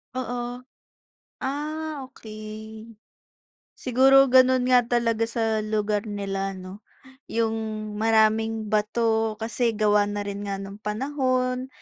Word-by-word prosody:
Oo. 245 -1 -4 0.8
Ah, 300 +1 -4
okey. 215 +1 -9 0.8
Siguro 270 +2 +5
gano'n 255 0 +5
nga 250 -1 +5
talaga 230 -1 +1
sa 225 -1 -1
lugar 210 -1 -1
nila 195 -2 -3
'no. 190 +3 -10 0.4
Yung, 225 -1 0 0.4
maraming 220 0 +2
bato 220 +1 +1
kasi 230 +1 0
gawa 210 -1 +3
na 205 0 -3
rin 200 0 -5
nga 195 -1 -3
nung 195 +1 -8
panahon, 255 +3 -1
225 Hz, 105 wpm, -25 LUFS, 210-250 Hz, 0.8 s, Siguro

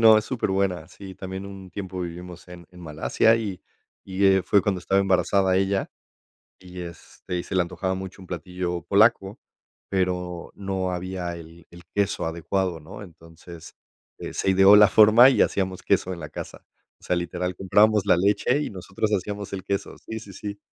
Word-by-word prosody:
no, 110 -1 +8
es 110 - -3
súper 125 -6 -2
buena. 95 -4 -1
Sí, 95 -2 -11
también 95 +1 -7
un 95 -2 -10
tiempo 95 -2 -6
vivimos 90 0 -8
en 85 -1 -12
en 90 0 -15
Malasia 80 +8 +2
y 100 -6 -4 0.5
y, 95 +1 0
eh, 95 -1 +5
fue 100 -3 +3
cuando 100 -3 0
estaba 95 +2 +1
embarazada 95 0 +2
ella 95 0 0 0.7
y, 90 0 -10
este, 85 +1 -7
y 85 - -3
se - - -7
la 90 - +3
antojaba 90 +2 -3
mucho 95 +1 -8
un 95 - -12
platillo 90 0 -4
polaco, 100 -1 +3 0.5
pero 90 -2 -2
no 95 -2 -3
había 90 -1 -4
el 85 +1 -13
el 85 0 -14
queso 100 -4 0
adecuado, 85 +1 -2
¿no? 100 +8 -10
Entonces, 85 -2 -13 0.4
eh, - - -7
se 95 - 0
ideó 95 +2 +7
la 105 0 +8
forma 110 +4 +7
y - - +3
hacíamos 95 -2 -1
queso 95 - +1
en 85 - -7
la 75 - -7
casa. - - -9 0.4
O - - -19
sea, 90 - 0
literal, 90 +1 -3
comprábamos 105 +2 +3
la - - +5
leche 105 +9 +2
y - - -4
nosotros 95 +3 -3
hacíamos 100 0 -3
el 95 -1 -5
queso. 100 0 -3
Sí, 110 - -7
sí, 100 -3 -12
sí. 100 +2 -7
95 Hz, 185 wpm, -24 LUFS, 90-100 Hz, 0.7 s, no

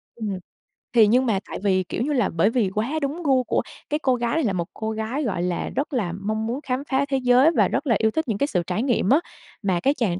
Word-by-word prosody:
Ừm. 210 -5 -4 0.6
Thì 225 -3 +6
nhưng 250 +5 +3
mà 215 -5 +1
tại - - -5
vì, 190 -2 +2
kiểu - - -3
như 295 +3 -1
là, 245 -7 +2
bởi 170 +5 +2
vì 225 -4 +1
quá 220 +5 -1
đúng 290 +5 -3
gu 265 -4 +3
của - - 0 0.3
cái 300 - 0
cô 260 -4 +2
gái 235 +1 -1
này, 325 - +1
là 210 -6 +1
một 170 -2 -2
cô 220 0 -3
gái, 220 +7 -3
gọi 205 -8 -1
là, 180 -1 -2
rất 285 +2 -2
là 210 -9 0
mong 215 +2 -2
muốn 245 +4 -2
khám 260 -1 -2
phá 270 +1 +2
thế 270 - +1
giới 255 +4 +5
và - - +4
rất 300 - -2
là 235 - +4
yêu 220 0 +2
thích 315 +4 -2
những 220 -4 -1
cái 280 - +1
sự 180 -10 0
trải 190 +5 -1
nghiệm 245 -7 +1
á, 280 - +6 0.4
mà 190 -4 +1
cái 275 +9 +2
chàng 205 -10 -1
235 Hz, 275 wpm, -23 LUFS, 205-270 Hz, 0.6 s, Thì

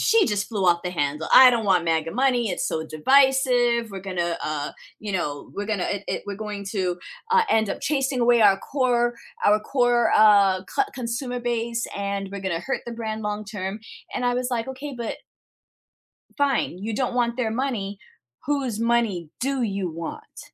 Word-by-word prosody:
she 455 -2 +4
just 205 -2 -1
flew 205 -5 -2
off 170 -1 +4
the 180 - -2
handle, 150 -1 -2
"I 255 -1 +10
don't 230 -3 -1
want 180 -3 +3
MAGA 165 0 0
money. 250 -1 +2
It's 180 - -2
so 160 0 -3
divisive. 245 - +3
We're 195 - -6
gonna, 175 -3 -2
uh, 150 -1 -3 0.3
you 210 -2 -5
know, 145 -6 -3
we're 205 +1 -4
gonna 210 -4 -1
i 205 -1 -2
i - - -2
we're 200 -1 -5
going 210 -2 -6
to, 185 -4 -1 0.3
uh, 470 -1 +6
end 220 -2 +3
up - - -4
chasing 270 -3 0
away 240 -1 +4
our 200 -2 +6
core 240 -2 0 0.3
our 210 +1 +4
core, 240 -1 +2
uh, 200 -3 +5
co 410 - 0
consumer 245 +1 -3
base, 235 -1 -2
and 200 -1 -3
we're 200 - -5
gonna 185 -3 -2
hurt 270 +8 -3
the 235 - -5
brand 220 -1 -4
long 210 0 -3
term." 205 -1 -5 0.4
And 250 - -2
I 245 - +2
was 250 0 -1
like, 240 0 -2
"Okay, 275 +2 -6
but" 235 - -4 1.2
fine. 275 - 0
You 215 +3 -4
don't 250 +1 -1
want 240 0 0
their 230 -3 0
money. 220 -5 -3 0.5
Whose 270 -6 -1
money 230 -8 0
do 270 +1 -1
you 195 -5 -2
want? 165 0 -8
220 Hz, 185 wpm, -24 LUFS, 195-245 Hz, 1.2 s, I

